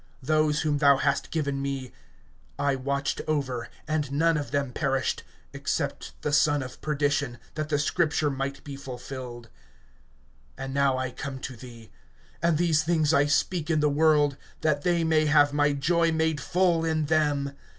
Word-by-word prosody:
Those 155 +1 +2
whom 150 -2 0
thou 140 -2 +6
hast 140 0 0
given 140 -4 -2
me 135 -2 -4 0.7
I 140 -1 +1
watched 140 +1 -2
over 130 -6 -2 0.2
and 155 -3 -1
none 165 +3 +2
of 145 -2 -3
them 140 -3 -1
perished, 135 -3 0 0.3
except - - -3
the 150 - -1
son 145 -1 +3
of 125 -1 -10
perdition, 145 -4 0 0.2
that 155 -1 -4
the 145 - +2
scripture 150 0 +1
might 140 +1 -4
be 140 -1 -7
fulfilled. 125 -3 -8 1.1
(13)And 135 - -5
now 140 -1 +2
I 130 -1 -2
come 140 +1 -6
to 130 - -6
thee; 115 -2 -12 0.5
and 170 -1 +2
these 160 -2 +3
things 160 -1 +2
I 140 +1 +4
speak 155 +2 0
in 160 -2 +2
the 150 0 +3
world, 145 -1 +3 0.2
that 150 -2 +1
they 170 +1 +1
may 155 -1 +3
have 145 -1 +4
my 145 0 +3
joy 165 +4 +2
made 160 -2 0
full 175 0 +2
in 160 -1 0
them. 145 -2 +1
145 Hz, 165 wpm, -27 LUFS, 140-155 Hz, 1.1 s, thou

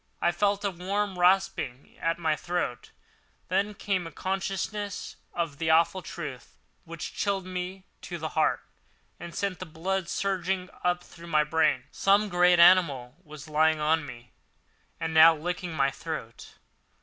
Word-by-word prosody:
I - - +2
felt 200 +3 0
a 200 - +1
warm 190 +2 -2
rasping 175 -8 +1
at 165 0 0
my 160 -3 +1
throat, 175 -6 -3 0.6
then 200 +3 0
came 190 -4 -1
a - - -9
consciousness 195 +2 -3 0.2
of 165 -4 -3
the 165 -1 0
awful 165 +4 +4
truth, 145 -9 -8 0.3
which 165 -1 -7
chilled 195 -2 -1
me 185 +1 -5 0.2
to 175 - -6
the 160 -1 -4
heart 155 0 +1 0.6
and 170 -1 -8
sent 195 -3 -2
the 185 - -5
blood 175 +3 -2
surging 190 -1 -1
up 180 0 +1
through 170 -1 -13
my 155 -2 +3
brain. 150 -4 +2
Some 200 +2 +3
great 180 -1 +4
animal 160 -8 +5
was 155 -2 -11
lying 155 +1 +3
on 155 +1 +2
me 125 -3 -11 0.7
and 160 -1 -3
now 160 +1 +8
licking 175 +3 -4
my 135 -2 +2
throat. 135 -6 -7
175 Hz, 150 wpm, -28 LUFS, 155-190 Hz, 0.7 s, now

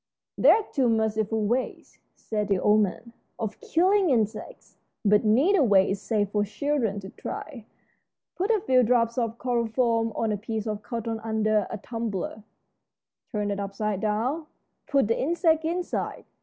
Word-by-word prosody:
"There - - +6
are 440 - -1
two 260 -4 +2
merciful 220 -1 0
ways," 245 +5 -3 0.2
said 210 -2 -3
the 200 -2 +2
old 210 +3 +4
man, 210 +4 -3 0.2
"of 220 -3 -4
killing 375 +2 +2
insects, 230 - -2 0.3
but 205 0 +4
neither 285 - +4
way 200 -7 +4
is 195 - -3
safe 205 -3 -1
for 210 -1 +1
children 225 -2 -1
to 190 - -9
try. 245 -8 -7 0.7
Put 385 +4 -1
a 440 -3 +2
few 260 -11 +4
drops 235 0 +2
of 230 -1 -2
chloroform 235 -1 0
on 225 -1 0
a 210 - -1
piece 220 +1 -4
of 215 -1 -3
cotton 230 0 -4
under 215 -2 0
a - - -4
tumbler 215 -2 -4 0.9
turned 210 -2 -1
upside 200 0 -3
down. 240 +9 -1 0.4
Put 275 -6 +2
the 230 - 0
insect 320 +1 +2
inside. 350 +2 -3
225 Hz, 155 wpm, -26 LUFS, 210-260 Hz, 0.9 s, There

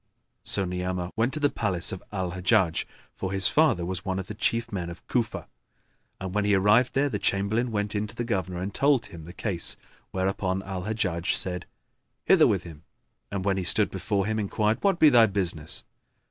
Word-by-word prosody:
So 100 - 0
Ni'amah 90 0 -3
went 115 +3 +1
to 155 - -1
the 145 -1 +2
palace 95 -5 -1
of 95 - -6
Al 95 -3 -2
Hajjaj, 90 -1 +2 0.3
for 95 - -4
his 95 -1 +5
father 150 - +3
was 95 +1 -4
one 95 -2 -2
of 95 - -3
the 105 - -7
chief 115 +2 -1
men 90 -4 -3
of 85 - -11
Cufa; 120 -3 -1 0.7
and, 95 -1 -5
when 105 0 +1
he 100 0 +3
arrived 105 +6 +4
there, 140 +2 +3
the 140 - -2
Chamberlain 105 +5 +1
went 105 -2 -1
in 105 0 -1
to 100 - -9
the 120 - -2
Governor 95 -6 -2
and 95 +2 -4
told 140 -4 +3
him 85 -5 -11
the 85 - -9
case; 90 -2 -2 0.3
whereupon 95 0 -1
Al 95 -2 -5
Hajjaj 95 -5 0
said, 90 -3 -1 0.6
"Hither - - +6
with - - +1
him!" 80 -4 -11 0.5
and 100 -2 -3
when 100 -1 +2
he 95 - -1
stood 105 +4 +2
before 100 +1 -1
him 110 +1 -1
enquired, 105 +2 0
"What 195 -3 +2
be 155 -3 +7
thy 120 -4 +6
business?" 85 -6 -3
95 Hz, 200 wpm, -27 LUFS, 90-110 Hz, 0.7 s, be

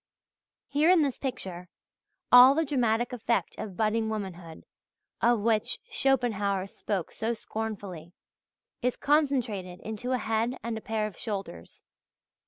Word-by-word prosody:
Here 295 +4 +3
in 360 -4 +6
this 275 -3 -2
picture, 185 -10 -5 0.6
all 250 +2 +9
the 325 +1 +2
dramatic 240 -4 +1
effect 235 -1 -1
of 195 -4 -6
budding 220 0 +1
womanhood, 180 -6 -6 0.6
of 235 -2 +3
which 220 -1 +1
Schopenhauer 210 -8 +1
spoke 195 -2 -4
so 230 +1 -2
scornfully, 200 -7 -6 0.7
is 250 0 0
concentrated 250 - 0
into 220 +3 -5
a - - +2
head 225 +2 -1
and 230 0 -3
a 220 - -5
pair 220 -1 -1
of 210 -5 -7
shoulders. 195 - -6
220 Hz, 130 wpm, -28 LUFS, 200-250 Hz, 0.7 s, all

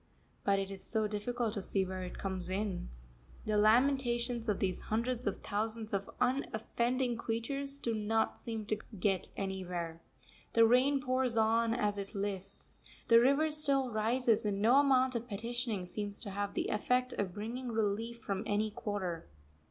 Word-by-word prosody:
But 200 0 +3
it 195 0 -2
is 195 -1 -7
so 220 -2 0
difficult 220 +2 -2
to 205 - -3
see 190 0 0
where 185 0 -5
it 180 - -6
comes 185 -2 -3
in. 190 - -2 0.6
The 215 - 0
lamentations 240 +1 +3
of 205 - +2
these 185 -2 0
hundreds 235 +2 -1
of 200 - 0
thousands 220 +1 -2
of 200 0 -1
unoffending 245 -1 0
creatures 275 +5 -3
do 235 -4 -1
not 220 +1 0
seem 225 -2 -4
to 215 0 0 0.2
get 190 -1 +1
anywhere. 180 -4 -4 0.5
The 230 0 +7
rain 260 +4 +4
pours 255 -2 +1
on 225 +1 +3
as 210 -3 0
it 200 +2 -6
lists, 195 -1 -5 0.3
the 230 0 +8
river 280 +6 +3
still 280 -4 +3
rises, 225 +1 +2
and 205 -2 -1
no 230 +6 +5
amount 260 -2 +4
of 235 0 -3
petitioning 230 -2 -2
seems 205 +2 -4
to 205 - -6
have 200 +1 -3
the - - -1
effect 250 +4 +1
of 190 -3 -3
bringing 235 +5 -4
relief 225 +2 -1
from 195 -2 -2
any 210 +1 +1
quarter. 190 -6 -4
220 Hz, 165 wpm, -33 LUFS, 200-245 Hz, 0.6 s, the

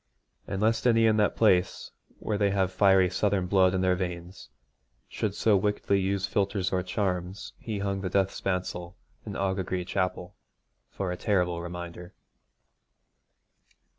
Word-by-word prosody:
And 100 +2 -2
lest 115 +2 +2
any 115 -1 +4
in 110 -1 +4
that 105 -1 +2
place, 95 -5 +2 0.3
where 105 -2 -3
they 100 -1 +3
have 95 -1 +1
fiery 95 -1 +5
southern 95 +1 0
blood 95 0 +3
in 95 - 0
their 95 0 +3
veins, 90 -2 -5 0.6
should - - -3
so 110 -2 +3
wickedly 100 0 +1
use 95 0 0
philtres 100 -2 -1
or 90 - +1
charms, 90 0 -3
he 110 -3 -4
hung 100 -1 -2
the 95 - -2
death 95 +1 +1
spancel 90 -2 -3 0.3
in - - -4
Aughagree 95 -2 -2
Chapel 90 -1 -2 0.5
for 95 -2 -4
a 90 - -4
terrible 90 -4 0
reminder. 85 0 -8
95 Hz, 145 wpm, -28 LUFS, 90-100 Hz, 0.6 s, fiery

